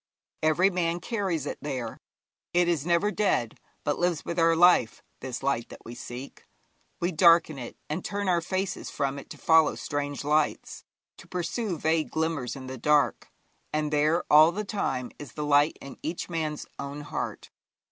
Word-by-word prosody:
Every 165 Hz, +5 st, +3 dB
man 175 Hz, -1 st, 0 dB
carries 190 Hz, -, -2 dB
it -, -, -5 dB
there. 130 Hz, -6 st, -4 dB, 0.6 s
It 175 Hz, 0 st, +4 dB
is 165 Hz, -3 st, 0 dB
never 175 Hz, +5 st, +2 dB
dead, 190 Hz, -, 0 dB, 0.2 s
but 145 Hz, -, -1 dB
lives 175 Hz, -3 st, 0 dB
with 170 Hz, -, -2 dB
our 165 Hz, 0 st, +4 dB
life, 170 Hz, -9 st, +4 dB, 0.2 s
this 130 Hz, -1 st, -6 dB
light 135 Hz, -4 st, 0 dB
that -, -, -13 dB
we 115 Hz, -, -7 dB
seek. 125 Hz, +2 st, -9 dB, 0.5 s
We 175 Hz, +2 st, 0 dB
darken 165 Hz, -3 st, +5 dB
it, 120 Hz, -, -8 dB
and 155 Hz, +4 st, -3 dB
turn 205 Hz, -1 st, -3 dB
our 175 Hz, -2 st, +3 dB
faces 185 Hz, +2 st, -3 dB
from 140 Hz, -1 st, -2 dB
it -, -, -13 dB
to -, -, -9 dB
follow 160 Hz, -1 st, +4 dB
strange 145 Hz, -1 st, -3 dB
lights, 150 Hz, +1 st, 0 dB, 0.3 s
to -, -, -14 dB
pursue 180 Hz, +2 st, -2 dB
vague 160 Hz, +1 st, +1 dB
glimmers 160 Hz, -6 st, -2 dB
in 135 Hz, -1 st, -8 dB
the 130 Hz, -1 st, -7 dB
dark, 150 Hz, +3 st, +2 dB, 0.4 s
and 150 Hz, 0 st, -1 dB
there, 155 Hz, +3 st, +2 dB
all 155 Hz, +2 st, +7 dB
the 210 Hz, +4 st, -4 dB
time, 135 Hz, -, -2 dB
is 145 Hz, -, -9 dB
the 150 Hz, -, -3 dB
light 145 Hz, +1 st, +4 dB
in 140 Hz, -, -10 dB
each 165 Hz, +3 st, -4 dB
man's 155 Hz, -3 st, -2 dB
own 140 Hz, +1 st, -5 dB
heart. 150 Hz, +1 st, -5 dB
155 Hz, 175 wpm, -27 LUFS, 145-175 Hz, 0.6 s, all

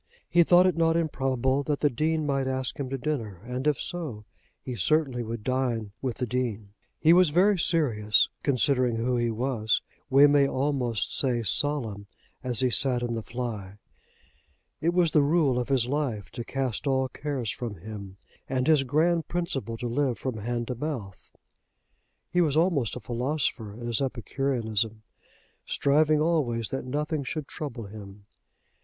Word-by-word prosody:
He 175 Hz, -, +4 dB
thought 175 Hz, +2 st, +6 dB
it 185 Hz, -3 st, +2 dB
not 165 Hz, 0 st, +2 dB
improbable 135 Hz, -4 st, 0 dB
that 145 Hz, 0 st, -2 dB
the 145 Hz, -, +4 dB
Dean 155 Hz, +5 st, 0 dB
might 135 Hz, -2 st, 0 dB
ask 130 Hz, 0 st, -2 dB
him 135 Hz, -2 st, -3 dB
to 135 Hz, -, -2 dB
dinner, 120 Hz, -, -3 dB
and, 125 Hz, +4 st, -3 dB
if 150 Hz, -3 st, +2 dB
so, 145 Hz, -12 st, -5 dB, 0.3 s
he 125 Hz, -, -6 dB
certainly 130 Hz, -, +1 dB
would 115 Hz, -1 st, -5 dB
dine 120 Hz, -4 st, -1 dB
with 130 Hz, -3 st, -2 dB
the 125 Hz, -, -1 dB
Dean. 110 Hz, -4 st, -3 dB, 0.3 s
He 165 Hz, +1 st, +6 dB
was 180 Hz, -2 st, +6 dB
very 185 Hz, +5 st, +3 dB
serious, 115 Hz, -12 st, +3 dB
considering 130 Hz, -3 st, +2 dB
who 120 Hz, +2 st, 0 dB
he 120 Hz, -1 st, +1 dB
was, 115 Hz, -1 st, 0 dB, 0.3 s
we 140 Hz, +1 st, +7 dB
may 145 Hz, -1 st, +5 dB
almost 130 Hz, -6 st, -1 dB
say 125 Hz, -4 st, +1 dB
solemn, 110 Hz, -3 st, -1 dB, 0.4 s
as 125 Hz, -2 st, +1 dB
he 130 Hz, -1 st, +2 dB
sat 125 Hz, -1 st, +3 dB
in 120 Hz, -1 st, -2 dB
the 115 Hz, -, -2 dB
fly. 110 Hz, -5 st, -5 dB, 1.0 s
It 170 Hz, -, +2 dB
was 175 Hz, -3 st, +3 dB
the 150 Hz, -, +5 dB
rule 145 Hz, -4 st, +2 dB
of 125 Hz, 0 st, -3 dB
his 130 Hz, -4 st, +2 dB
life 130 Hz, -6 st, -2 dB
to 120 Hz, 0 st, -5 dB
cast 135 Hz, +1 st, -3 dB
all 130 Hz, -1 st, +2 dB
cares 135 Hz, -4 st, -3 dB
from 120 Hz, -5 st, -5 dB
him, 100 Hz, 0 st, -9 dB, 0.3 s
and 130 Hz, -1 st, 0 dB
his 155 Hz, -2 st, +5 dB
grand 160 Hz, +4 st, +1 dB
principle 135 Hz, -10 st, -3 dB
to 120 Hz, -, -4 dB
live 125 Hz, 0 st, 0 dB
from 130 Hz, -4 st, -4 dB
hand 120 Hz, +2 st, -3 dB
to -, -, 0 dB
mouth. 120 Hz, -9 st, -6 dB, 1.0 s
He 180 Hz, 0 st, +3 dB
was 155 Hz, -3 st, +2 dB
almost 160 Hz, -, +2 dB
a -, -, -5 dB
philosopher 125 Hz, -1 st, -2 dB
in 120 Hz, +1 st, -8 dB
his 120 Hz, 0 st, 0 dB
epicureanism, 120 Hz, -4 st, -2 dB, 0.6 s
striving 150 Hz, +2 st, +3 dB
always 140 Hz, -9 st, +1 dB
that 135 Hz, -, -4 dB
nothing 150 Hz, +3 st, -2 dB
should 150 Hz, +1 st, -4 dB
trouble 130 Hz, -6 st, -6 dB
him. 100 Hz, -1 st, -11 dB
130 Hz, 165 wpm, -27 LUFS, 115-150 Hz, 1.0 s, we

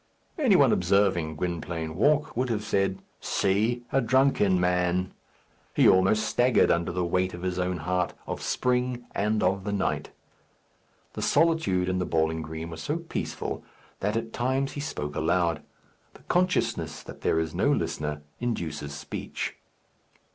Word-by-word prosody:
Any 255 Hz, -10 st, +4 dB
one 140 Hz, -8 st, +6 dB
observing 90 Hz, -4 st, +2 dB
Gwynplaine 80 Hz, -1 st, -3 dB
walk 145 Hz, -, +2 dB
would 125 Hz, +2 st, 0 dB
have 110 Hz, -2 st, -1 dB
said, 95 Hz, -3 st, 0 dB, 0.2 s
"See! 110 Hz, +5 st, +1 dB
a 135 Hz, -, +3 dB
drunken 120 Hz, -6 st, +3 dB
man!" 90 Hz, +1 st, +1 dB, 0.6 s
He -, -, +6 dB
almost 95 Hz, +3 st, +4 dB
staggered 125 Hz, 0 st, +3 dB
under 85 Hz, 0 st, +1 dB
the 90 Hz, 0 st, -1 dB
weight 90 Hz, +1 st, 0 dB
of 90 Hz, -, -9 dB
his 90 Hz, -1 st, -1 dB
own 90 Hz, 0 st, 0 dB
heart, 90 Hz, +3 st, -1 dB
of -, -, -5 dB
spring, 125 Hz, -1 st, 0 dB
and 105 Hz, +1 st, 0 dB
of 95 Hz, +1 st, +1 dB
the 105 Hz, -, -3 dB
night. 100 Hz, -2 st, -1 dB, 1.0 s
The -, -, -5 dB
solitude 145 Hz, -, +2 dB
in 95 Hz, 0 st, 0 dB
the 90 Hz, -, -1 dB
bowling 80 Hz, 0 st, +1 dB
green 80 Hz, +1 st, -6 dB
was 80 Hz, 0 st, -7 dB
so 150 Hz, +3 st, -1 dB
peaceful 170 Hz, -1 st, -4 dB, 0.4 s
that 105 Hz, +3 st, 0 dB
at 115 Hz, 0 st, -4 dB
times 130 Hz, +3 st, 0 dB
he 145 Hz, -, -5 dB
spoke 75 Hz, -, -4 dB
aloud. 85 Hz, -1 st, +1 dB, 0.5 s
The -, -, -16 dB
consciousness 180 Hz, +1 st, 0 dB
that -, -, -11 dB
there -, -, +2 dB
is 80 Hz, -1 st, -2 dB
no -, -, +2 dB
listener 75 Hz, -1 st, -2 dB, 0.2 s
induces 80 Hz, -11 st, -3 dB
speech. -, -, -5 dB
95 Hz, 155 wpm, -27 LUFS, 85-120 Hz, 1.0 s, one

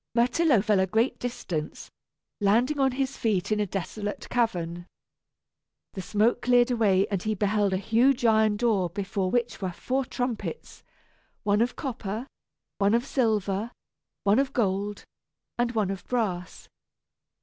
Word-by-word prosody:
Myrtillo 245 Hz, 0 st, +3 dB
fell 210 Hz, -2 st, +3 dB
a 190 Hz, -, +2 dB
great 225 Hz, +6 st, +1 dB
distance, 175 Hz, -10 st, -5 dB, 0.5 s
landing 235 Hz, +8 st, +2 dB
on 265 Hz, -1 st, +3 dB
his 270 Hz, +1 st, -2 dB
feet 205 Hz, -3 st, 0 dB
in 210 Hz, -, +2 dB
a 210 Hz, -, 0 dB
desolate 205 Hz, +3 st, -4 dB
cavern. 175 Hz, -7 st, -1 dB, 1.1 s
The 190 Hz, -, -5 dB
smoke 215 Hz, +5 st, +1 dB
cleared 245 Hz, 0 st, +4 dB
away 200 Hz, -5 st, +3 dB
and 195 Hz, -3 st, 0 dB
he 215 Hz, +2 st, -1 dB
beheld 205 Hz, 0 st, +1 dB
a 190 Hz, -, +1 dB
huge 240 Hz, +6 st, +2 dB
iron 220 Hz, -2 st, +4 dB
door 205 Hz, -6 st, +1 dB
before 190 Hz, +1 st, -2 dB
which 240 Hz, 0 st, -1 dB
were 190 Hz, -2 st, -2 dB
four 260 Hz, +9 st, -2 dB
trumpets 245 Hz, -, -4 dB, 0.6 s
one 205 Hz, +1 st, +2 dB
of 240 Hz, -, 0 dB
copper, 230 Hz, -5 st, -4 dB, 0.5 s
one 200 Hz, +2 st, +3 dB
of 235 Hz, +2 st, +1 dB
silver, 215 Hz, -4 st, 0 dB, 0.5 s
one 205 Hz, +4 st, +4 dB
of 275 Hz, 0 st, 0 dB
gold, 205 Hz, -2 st, -1 dB, 0.6 s
and 240 Hz, 0 st, +1 dB
one 210 Hz, -4 st, 0 dB
of 195 Hz, -, -6 dB
brass. 190 Hz, -8 st, -2 dB
215 Hz, 145 wpm, -27 LUFS, 195-245 Hz, 1.1 s, cleared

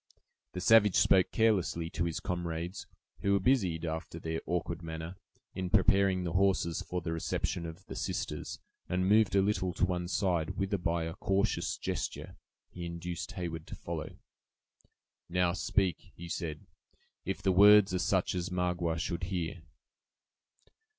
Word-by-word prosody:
The 90 Hz, -, -4 dB
savage 105 Hz, 0 st, +6 dB
spoke 95 Hz, -2 st, +5 dB
carelessly 95 Hz, -7 st, +1 dB
to 85 Hz, -, -1 dB
his 85 Hz, -2 st, -2 dB
comrades, 85 Hz, +1 st, -4 dB, 0.3 s
who 100 Hz, -, +1 dB
were 100 Hz, -, +4 dB
busied, 95 Hz, -8 st, +1 dB
after 80 Hz, +1 st, -4 dB
their 80 Hz, 0 st, -3 dB
awkward 85 Hz, -1 st, -2 dB
manner, 80 Hz, +1 st, -6 dB, 0.4 s
in 95 Hz, -1 st, -3 dB
preparing 95 Hz, -1 st, +3 dB
the 85 Hz, -2 st, -3 dB
horses 95 Hz, -3 st, +2 dB
for 90 Hz, 0 st, -4 dB
the 85 Hz, 0 st, -3 dB
reception 85 Hz, +1 st, -2 dB
of 85 Hz, +4 st, -10 dB
the -, -, -8 dB
sisters, -, -, -3 dB, 0.3 s
and 90 Hz, +1 st, +1 dB
moved 105 Hz, 0 st, +4 dB
a 95 Hz, -, +5 dB
little 95 Hz, -3 st, 0 dB
to -, -, +2 dB
one 90 Hz, -1 st, -2 dB
side, 90 Hz, -3 st, 0 dB
whither 95 Hz, 0 st, 0 dB
by 85 Hz, -1 st, 0 dB
a 80 Hz, 0 st, -4 dB
cautious 95 Hz, +2 st, 0 dB
gesture -, -, -4 dB, 0.4 s
he 90 Hz, -, -7 dB
induced 85 Hz, 0 st, -5 dB
Heyward 85 Hz, -3 st, -5 dB
to -, -, -7 dB
follow. -, -, -6 dB, 1.1 s
"Now, 90 Hz, 0 st, +2 dB
speak," 95 Hz, -2 st, +1 dB, 0.2 s
he 85 Hz, -, -8 dB
said; 80 Hz, -3 st, -4 dB, 0.6 s
"if 95 Hz, +1 st, -4 dB
the 95 Hz, -, +3 dB
words 100 Hz, +1 st, +7 dB
are 90 Hz, -, +1 dB
such 95 Hz, 0 st, +1 dB
as 90 Hz, 0 st, -2 dB
Magua 90 Hz, -2 st, -1 dB
should 85 Hz, +1 st, -2 dB
hear." 90 Hz, -2 st, -3 dB
90 Hz, 155 wpm, -31 LUFS, 85-95 Hz, 1.1 s, words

